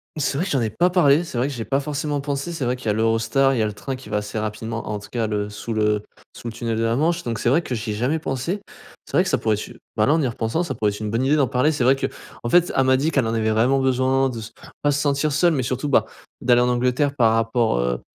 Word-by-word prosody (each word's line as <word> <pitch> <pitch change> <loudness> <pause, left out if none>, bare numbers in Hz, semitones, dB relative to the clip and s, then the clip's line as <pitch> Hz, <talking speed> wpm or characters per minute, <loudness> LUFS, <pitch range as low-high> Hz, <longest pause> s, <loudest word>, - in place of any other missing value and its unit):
C'est 145 -2 -1
vrai 175 - 0
que 190 - -4
j'en 135 -4 +1
ai 110 - -1
pas 175 - +2
parlé, 165 -3 +4
c'est 130 - -6
vrai 125 +3 +1
que 145 - -4
j'ai 115 - -4
pas 135 0 +1
forcément 145 0 -2
pensé, 140 +3 -3
c'est 165 -6 -3
vrai 125 +1 0
qu'il 125 -3 -9
y - - +2
a 105 - +3
l'Eurostar, 115 +5 +2
il 125 - -1
y - - +2
a 110 - +2
le 105 - -5
train 135 +5 -5
qui 130 -4 -12
va 105 - 0
assez 105 +1 -4
rapidement 110 +1 -4
en 105 - -2
tout 100 0 -11
cas 115 -2 -1
le 105 -1 -2
sous 110 +2 -5
le 105 -1 +1 0.3
sous 120 - -8
le 115 - -5
tunnel 115 -1 -3
de 115 - -1
la 115 0 +1
Manche, 165 +5 +1
donc 115 -2 -3
c'est 120 - 0
vrai 160 +7 +3
que 130 - -4
j'y 110 -1 -4
ai - - -1
jamais 125 +9 0
pensé. 155 +7 -3 0.4
C'est - - -6
vrai - - +5
que - - -2
ça - - +2
pourrait 110 -1 +1
être 105 - -6
une, - - -13 0.2
bah, 105 - +2
là 145 - +4
en 160 - +2
y 135 - +1
repensant 115 +7 -1
ça 140 -6 -3
pourrait 110 -2 0
être 105 - -7
une 105 -1 -3
bonne 115 +3 0
idée 145 +3 +3
d'en 140 -4 +3
parler. 130 +7 +2
C'est 145 -5 -1
vrai 130 +2 +5
qu'en 120 -3 -6
fait 175 +3 +4
elle 135 - +4
m'a 130 0 +4
dit 155 +4 0
qu'elle 135 -5 +1
en 115 - -1
avait 110 -1 +1
vraiment 120 +5 +3
besoin 130 0 +2
de 115 -2 -6
se 110 - -9 0.3
pas 145 - +2
se 145 - 0
sentir 145 +1 +1
seule, 165 +4 +3
mais 135 - 0
surtout, 130 +4 -2
bah, 140 - +3 0.4
d'aller 120 0 +4
en 125 - +2
Angleterre 125 +4 +1
par 115 -4 +4
rapport, 115 - +1
heu, 60 0 -1
125 Hz, 315 wpm, -22 LUFS, 115-140 Hz, 0.4 s, vrai